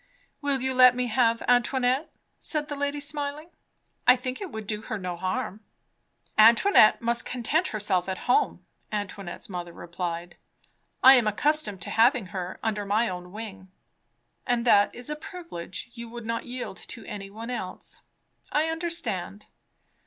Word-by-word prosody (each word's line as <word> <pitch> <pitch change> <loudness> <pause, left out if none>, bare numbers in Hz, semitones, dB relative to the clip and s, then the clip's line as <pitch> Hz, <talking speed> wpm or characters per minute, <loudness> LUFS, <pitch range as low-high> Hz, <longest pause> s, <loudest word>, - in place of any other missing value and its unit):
"Will 280 -3 0
you 260 0 0
let 255 -1 +7
me 250 0 0
have 230 0 +2
Antoinette?" 255 +4 +2 0.3
said 300 -2 -3
the 290 - -3
lady 285 +1 -2
smiling. 290 +2 -3 0.6
"I 250 - +9
think 255 +3 -5
it 390 - -4
would 220 -5 -7
do 210 +1 -3
her 215 - -4
no 180 -2 -4
harm." 185 +3 -3 0.8
"Antoinette 230 - +6
must 235 0 +2
content 280 +8 0
herself 195 -4 0
at 190 - -2
home," 425 - +2 0.3
Antoinette's 205 -3 -4
mother 175 -3 -6
replied. 175 0 -5 0.7
"I 265 - +11
am 235 -3 +2
accustomed 215 - +1
to - - -5
having 235 0 +4
her 185 -1 -5
under 215 -2 -1
my 215 +3 +1
own 180 -1 -7
wing." 195 -3 -8 0.8
"And 245 -1 +1
that 205 -3 +5
is 245 +4 -6
a - - -1
privilege 300 - -8
you 235 -1 -8
would 235 -1 -8
not 230 +1 -3
yield 250 0 -6
to 225 -4 -9
any 200 -2 -7
one 225 +4 -7
else. 185 -7 -6 0.5
I 310 +2 +2
understand. 320 - -3
230 Hz, 155 wpm, -27 LUFS, 200-265 Hz, 0.8 s, I